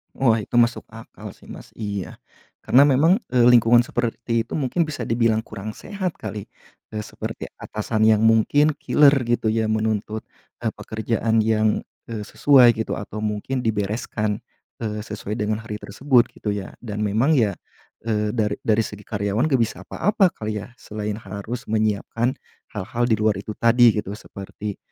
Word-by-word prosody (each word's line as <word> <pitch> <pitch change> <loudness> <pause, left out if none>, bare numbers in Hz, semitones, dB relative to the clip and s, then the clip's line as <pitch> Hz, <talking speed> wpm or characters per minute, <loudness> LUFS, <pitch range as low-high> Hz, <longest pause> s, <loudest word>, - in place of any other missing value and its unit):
Wah 115 -5 +2
itu 120 - +1
masuk 120 0 +2
akal 115 0 -10
sih - - -19
Mas, - - -11
iya. 100 -4 -5 0.4
Karena 135 +3 +5
memang, 145 +5 +5 0.2
eee, 120 -1 +5
lingkungan 120 -1 +6
seperti 120 -1 -1
itu 115 - -10
mungkin 145 +5 +1
bisa 145 -7 -5
dibilang 115 -1 +2
kurang 110 -1 -7
sehat 185 - -5
kali, 105 -1 -5 0.5
eee, 110 - -4
seperti - - -6
atasan 110 0 -2
yang 110 -1 +5
mungkin 115 +7 +4
killer 145 -2 +5
gitu 120 -1 0
ya 110 0 +1
menuntut, 110 0 -2 0.3
eee, - - -2
pekerjaan 110 0 -1
yang, 110 -1 +2 0.3
eee, 105 -2 -5
sesuai 125 -5 +5
gitu 110 -1 -3
atau 105 +1 -6
mungkin 110 +5 -2
dibereskan, 105 -1 -2 0.4
eee, 105 -1 -3
sesuai 105 +1 -5
dengan 105 +1 -1
hari 105 -1 -6
tersebut 125 +4 +2
gitu 105 - -5
ya. 100 -2 -5
Dan 105 -3 -5
memang 115 +9 +2
ya, 110 - +2 0.5
eee, 105 -1 -1
dari 105 -3 0
dari 110 0 +3
segi 105 -1 -9
karyawan 105 +5 0
gak 135 -5 +2
bisa 110 - -5
apa-apa 205 +1 +2
kali 105 -1 -3
ya, 120 +4 -11
selain 105 -3 -5
harus 110 +2 -6
menyiapkan 110 +3 0 0.4
hal-hal 120 +5 -1
di 110 - +3
luar 105 -2 +1
itu 105 - -7
tadi 120 +1 +6
gitu. 105 -1 -3
Seperti, 105 0 -8
110 Hz, 160 wpm, -23 LUFS, 105-120 Hz, 0.5 s, lingkungan